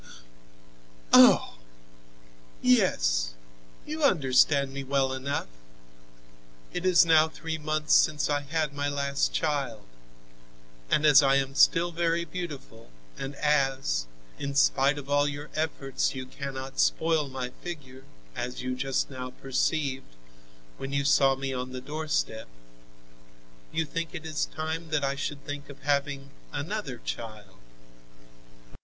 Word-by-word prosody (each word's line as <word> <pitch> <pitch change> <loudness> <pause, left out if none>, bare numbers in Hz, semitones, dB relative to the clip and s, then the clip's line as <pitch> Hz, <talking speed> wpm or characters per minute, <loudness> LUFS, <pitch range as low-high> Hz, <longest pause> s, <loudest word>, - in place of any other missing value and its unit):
"Oh! - - +7 1.0
yes; - - +2 0.5
you 310 +1 -5
understand 140 - +3
me 140 0 -4
well 135 -1 +1
enough. 140 +2 -2 1.3
It 180 +1 -1
is 180 -1 +6
now 160 -1 +5
three 160 0 -5
months 155 0 0
since 150 -2 +4
I 145 -1 0
had 150 0 -2
my 145 0 -2
last 140 0 0
child, 140 -8 -2 1.0
and 150 - +2
as 150 -1 +8
I 135 -1 +4
am 135 0 0
still 170 +4 +4
very 170 0 0
beautiful, 145 - -8 0.3
and 135 +1 -6
as, 135 - +1 0.3
in 140 0 -4
spite 140 +1 +3
of 140 -2 -7
all 145 0 +2
your 145 +1 -6
efforts 145 -4 -1
you 130 0 -5
cannot 135 0 -7
spoil 160 -3 +2
my 130 -1 -5
figure, 135 -7 -8 0.3
as 125 0 -4
you 130 0 -2
just 135 +1 -1
now 125 -1 -6
perceived, 135 - -2 0.6
when 135 - -5
you 140 0 0
saw 135 -1 +4
me 135 0 -4
on 130 0 -4
the 130 - -4
doorstep, 150 -5 -2 1.2
you 160 0 0
think 165 +2 -4
it 160 -2 -7
is 155 -1 -1
time 160 +1 -4
that 155 -2 0
I 140 0 +1
should 145 +1 -5
think 145 0 -6
of 140 -1 -12
having 140 -1 -1 0.2
another 145 - -4
child." 105 -4 -7
140 Hz, 130 wpm, -27 LUFS, 135-155 Hz, 1.3 s, as